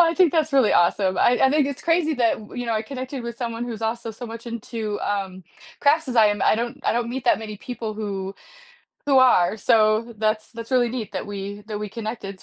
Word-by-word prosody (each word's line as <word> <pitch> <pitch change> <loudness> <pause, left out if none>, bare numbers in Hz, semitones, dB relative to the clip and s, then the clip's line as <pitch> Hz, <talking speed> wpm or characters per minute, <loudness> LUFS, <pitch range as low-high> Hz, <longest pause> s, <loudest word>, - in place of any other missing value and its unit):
I 335 -1 +5
think 365 -5 +4
that's 315 -2 +1
really 265 -5 +4
awesome. 185 +2 +2
I 245 - +4
I 265 - +5
think 295 -1 +3
it's 280 -2 -5
crazy 330 -2 +2
that 235 -3 +2
w 210 - -12
you 245 - -4
know, 230 - 0
I 215 -1 0
connected 260 +2 -6
with 235 -1 -6
someone 235 -1 -3
who's 230 -2 -6
also 225 +1 -2
so 235 +3 -8
much 230 +1 -9
into, 225 -2 -4
um, 190 -2 -3 0.4
crafts 300 +1 +3
as 250 - -3
I 220 -2 +7
am. 205 -1 0
I - - +4
don't 235 +2 -3
I - - +2
don't 235 0 -1
meet 255 +1 -4
that - - +4
many 215 -1 -7
people 230 -2 -6
who 195 -2 -4 0.7
who 275 -2 +5
are, 220 -6 +5
so 220 +2 +2
that's 215 0 0
that's 230 +1 -8
really 250 -2 +3
neat 235 -3 -5
that - - -4
we 205 0 -6
that 210 -2 -4
we 210 - -4
connected. 215 -3 -6
230 Hz, 235 wpm, -23 LUFS, 210-255 Hz, 0.7 s, I